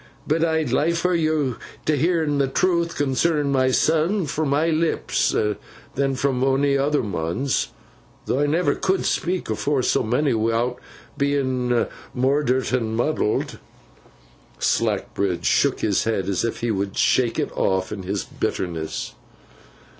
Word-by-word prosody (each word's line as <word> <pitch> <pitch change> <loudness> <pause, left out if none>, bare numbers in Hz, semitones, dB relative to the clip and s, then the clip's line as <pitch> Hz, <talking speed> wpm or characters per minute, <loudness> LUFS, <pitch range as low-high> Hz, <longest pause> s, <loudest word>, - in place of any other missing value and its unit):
But 160 +2 +1
I'd 160 -5 +1
liefer 170 +6 +1
you'd 155 -6 +1 0.3
hearn 155 -1 +1
the 140 - +2
truth 170 +3 0
concernin 145 +1 +1
myseln, 155 +8 +2
fro 155 +3 -1
my 150 +4 +2
lips 160 +1 0 0.6
than 135 0 0
fro 140 +1 +1
onny 135 +1 +2
other 145 +1 +1
man's, 100 +7 -1 0.6
though 130 - 0
I 145 - +2
never 155 -1 +2
cud'n 190 0 0
speak 180 +1 -1
afore 135 +4 0
so - - +2
monny, 125 +5 +1
wi'out 115 +2 0 0.4
bein 130 -4 +1 0.3
moydert 130 0 +1
and 115 -3 0
muddled.' 120 -3 0 1.0
Slackbridge 90 -4 0
shook - - +2
his 105 -1 +1
head 105 -4 -1
as 95 -3 0
if 115 - -3
he 120 -1 0
would 100 -1 -2
shake 120 -3 +2
it - - -1
off, 95 -1 0
in 105 -2 -5
his 95 +2 -3
bitterness. 80 -4 -4
135 Hz, 130 wpm, -23 LUFS, 115-155 Hz, 1.0 s, the